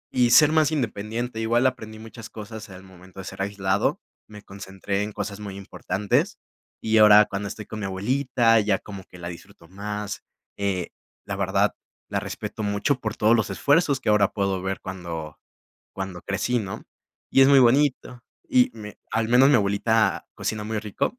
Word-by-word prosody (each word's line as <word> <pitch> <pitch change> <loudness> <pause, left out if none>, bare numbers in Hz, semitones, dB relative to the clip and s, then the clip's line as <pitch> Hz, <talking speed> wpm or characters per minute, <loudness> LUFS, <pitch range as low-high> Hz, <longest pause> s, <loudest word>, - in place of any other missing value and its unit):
Y 125 -1 +4
ser 150 +5 +7
más 155 -1 +3
independiente, 115 -3 -3
igual 115 +3 +1
aprendí 110 -4 -2
muchas 115 0 -10
cosas 110 0 -9
al 95 0 -11
momento 95 0 -15
de 95 - -6
ser - - -7
aislado, 100 0 0 0.3
me 105 -1 -12
concentré 100 0 -5
en 105 +1 -3
cosas 105 0 -5
muy 100 -2 -7
importantes, 100 +1 -1 0.4
y 110 0 +2
ahora 105 0 +8
cuando 100 0 -4
estoy 105 +1 -7
con 110 - -7
mi 100 - -3
abuelita, 115 +3 +2
ya 105 -2 +1
como 100 -2 -10
que - - -15
la 85 -1 -7
disfruto 85 -1 -13
más, 105 +1 -5 0.3
eh, 95 -3 -2 0.4
la 100 -1 -4
verdad, 100 +1 +1 0.4
la - - -1
respeto 110 - -6
mucho 105 +6 0
por 110 -1 -4
todos 110 +2 +4
los 110 - 0
esfuerzos 145 -2 +2
que 120 - -2
ahora 105 -1 +4
puedo 95 -2 -1
ver 95 0 -3
cuando 85 -5 -7 0.5
cuando 95 -2 -6
crecí, 110 +6 -1
¿no?, 100 -4 -6 0.5
y 135 - +6
es 135 - +6
muy 140 - +7
bonito, 125 -1 +2 0.3
y 255 -2 +4
me 105 -1 -10
al 115 -1 0
menos 130 +4 +6
mi 145 - +6
abuelita 110 +2 +1
cocina 105 -1 -3
muy 110 0 -3
rico, 105 - -2
105 Hz, 180 wpm, -24 LUFS, 95-115 Hz, 0.5 s, ahora